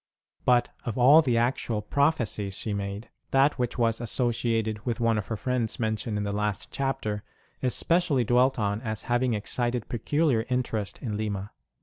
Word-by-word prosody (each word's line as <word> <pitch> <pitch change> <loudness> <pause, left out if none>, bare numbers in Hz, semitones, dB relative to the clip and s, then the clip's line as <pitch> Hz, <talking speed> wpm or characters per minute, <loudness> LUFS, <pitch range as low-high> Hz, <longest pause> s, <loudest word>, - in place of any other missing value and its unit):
But 125 -1 +4
of 115 -1 -4
all 140 +6 +8
the 125 -6 +1
actual 115 -3 0
prophecies 110 -7 0
she 110 - -2
made, 100 +2 -5 0.2
that 135 +1 +3
which 125 0 -1
was 115 -1 +1
associated 115 -2 0
with 120 -1 -2
one 115 -2 +2
of 100 - -6
her 110 - -3
friends 120 0 -1
mentioned 110 -1 -1
in 105 - -1
the 100 - -2
last 105 -1 -2
chapter 120 -7 -2 0.4
is 125 -2 +1
specially 165 -7 +2
dwelt 125 +3 +3
on 105 -1 -1
as 110 -3 -3
having 120 -1 +1
excited 120 +2 -2
peculiar 125 0 +1
interest 120 -5 -1
in 105 -5 -2
Lima. 105 -2 -3
115 Hz, 165 wpm, -27 LUFS, 105-125 Hz, 0.4 s, all